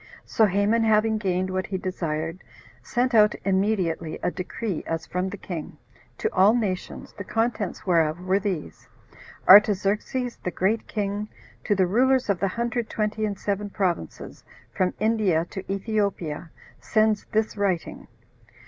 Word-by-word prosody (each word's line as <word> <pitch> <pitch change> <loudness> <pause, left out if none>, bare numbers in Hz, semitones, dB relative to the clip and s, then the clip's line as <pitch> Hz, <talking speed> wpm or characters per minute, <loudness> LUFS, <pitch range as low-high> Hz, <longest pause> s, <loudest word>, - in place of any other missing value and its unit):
So 220 - +3
Haman, 205 +4 +2
having 220 0 +3
gained 185 -2 -1
what 185 0 -2
he 195 - -2
desired, 165 -2 -3 0.4
sent 250 +1 0
out 210 -2 +5
immediately 190 -5 0
a - - +1
decree, 185 0 -4
as 165 0 -3
from 180 +1 -2
the 205 - -7
king, 175 -5 -7 0.4
to - - -2
all 200 +5 +5
nations, 200 -6 -3
the 200 - -6
contents 225 -2 -2
whereof 165 -3 +2
were 185 +2 +1
these: 185 - -4 0.6
"Artaxerxes, 210 +4 +5
the - - -1
great 200 +5 0
king, 205 0 -3 0.4
to 205 - +2
the 190 -1 +3
rulers 250 +4 +3
of 185 - -2
the 195 - +1
hundred 235 +3 -2
twenty 215 0 -1
and 200 -2 -4
seven 205 +1 -2
provinces, 180 - -3 0.3
from 185 -1 0
India 210 -7 +2
to 190 0 -6
Ethiopia, 195 -6 -2 0.3
sends 215 -1 +1
this 220 -1 -1
writing. 195 -5 -2
200 Hz, 145 wpm, -25 LUFS, 185-215 Hz, 0.6 s, out